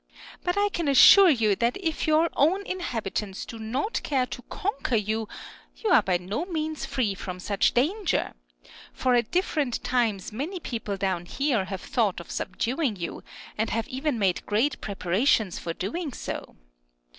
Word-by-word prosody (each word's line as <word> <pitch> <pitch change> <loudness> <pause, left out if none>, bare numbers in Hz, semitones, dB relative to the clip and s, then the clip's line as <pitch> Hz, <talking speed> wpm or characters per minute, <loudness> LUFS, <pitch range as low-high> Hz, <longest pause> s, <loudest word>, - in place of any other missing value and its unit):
But 355 +2 0
I 410 0 +3
can 340 -5 -2
assure 360 +8 +9
you 225 -8 +3
that 235 +1 +1
if 330 -6 -2
your 310 +2 +4
own 365 +8 +2
inhabitants 220 - -3
do 230 - -9
not 255 - -2
care 265 -3 +1
to 250 - -7
conquer 280 - -2
you, 220 +1 -1 0.5
you 435 - -1
are 260 - +7
by 185 -3 +1
no 195 - -3
means 315 -3 -3
free 255 -7 0
from 185 -1 -6
such 200 +2 +1
danger; 345 - +1 0.6
for 255 -1 +1
at 240 -2 +2
different 305 -8 0
times 225 -7 0
many 300 - -4
people 225 -9 -4
down 185 -2 -1
here 265 -7 0
have 190 -1 -5
thought 215 -7 0
of 170 - -10
subduing 245 - -1
you, 170 -3 -5 0.4
and 220 - +1
have 225 0 -1
even 270 0 -1
made 190 -4 +1
great 230 +8 +1
preparations 200 +1 +1
for 170 - -4
doing 240 - -4
so. - - -6
245 Hz, 165 wpm, -26 LUFS, 205-310 Hz, 0.6 s, assure